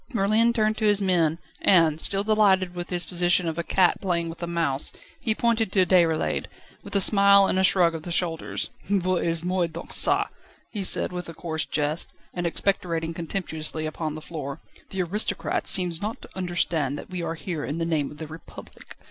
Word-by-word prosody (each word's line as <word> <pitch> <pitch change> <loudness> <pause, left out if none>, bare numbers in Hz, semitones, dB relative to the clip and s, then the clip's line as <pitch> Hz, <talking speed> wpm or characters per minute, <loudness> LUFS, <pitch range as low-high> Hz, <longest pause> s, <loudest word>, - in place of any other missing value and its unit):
Merlin 225 +2 +3
turned 215 -2 +1
to 220 - -1
his 205 -1 +4
men, 170 -5 +2 0.2
and, 160 -4 +4
still 195 0 0
delighted 200 -4 +3
with 175 0 -6
his 175 -2 0
position 175 -1 +2
of 165 +1 -3
a - - -1
cat 180 +1 +2
playing 170 -3 -1
with 165 - -9
a 170 - -3
mouse, 165 -5 0 0.3
he 220 -2 +1
pointed 230 -3 +1
to 190 -2 +4
Déroulède, 170 -4 +2 0.3
with - - -9
a - - +5
smile 200 0 +6
and 190 - +1
a - - +2
shrug 180 -3 +4
of 165 - -5
the 175 - -8
shoulders. 165 -2 -2 0.2
"Voyez 180 -4 0
moi 180 -1 0
donc 165 - -9
çà," - - +2 0.4
he 205 -3 -3
said, 185 - +1
with 180 -1 -6
a 165 - -9
coarse 160 -2 -4
jest, 150 +2 -2 0.2
and 175 -1 -2
expectorating 165 -3 -1
contemptuously 160 -2 -4
upon 155 0 -4
the 155 - -7
floor, 140 -4 -6 0.3
"the 190 -1 -2
aristocrat 205 +5 -2
seems 175 -4 +5
not 215 +2 -4
to - - -12
understand 170 -6 -1
that - - -10
we 180 -1 -4
are 165 - -3
here 160 -2 -5
in 145 - -4
the 165 - -1
name 155 -4 -1
of 150 - -12
the 160 - -6
Republic. 160 +2 -12
175 Hz, 200 wpm, -25 LUFS, 165-195 Hz, 0.4 s, smile